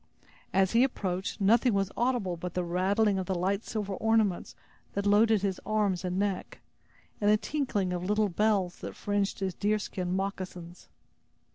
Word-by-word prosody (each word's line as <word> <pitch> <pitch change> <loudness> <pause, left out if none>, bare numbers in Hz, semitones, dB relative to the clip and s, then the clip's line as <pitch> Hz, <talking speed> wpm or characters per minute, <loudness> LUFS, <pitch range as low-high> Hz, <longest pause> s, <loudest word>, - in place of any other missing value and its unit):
As 190 0 +3
he 235 +2 +5
approached, 190 -8 -2
nothing 225 +3 +4
was 195 0 0
audible 240 -7 0
but 175 +1 -6
the 180 - 0
rattling 195 +4 +1
of 185 - -4
the 190 - -1
light 195 +4 0
silver 210 -3 -3
ornaments 220 -2 +1 0.4
that 200 0 -2
loaded 210 0 +4
his 195 -2 -1
arms 205 -4 0
and 180 0 -2
neck, 195 -2 -2 0.6
and 205 - +3
the 210 - +6
tinkling 215 -9 -1
of 175 - -2
the 180 - -4
little 210 0 +2
bells 195 -1 +1
that - - -7
fringed 205 -1 -1
his 190 -1 -1
deerskin 200 -3 -1
moccasins. 185 -3 -5
200 Hz, 165 wpm, -29 LUFS, 185-215 Hz, 0.6 s, the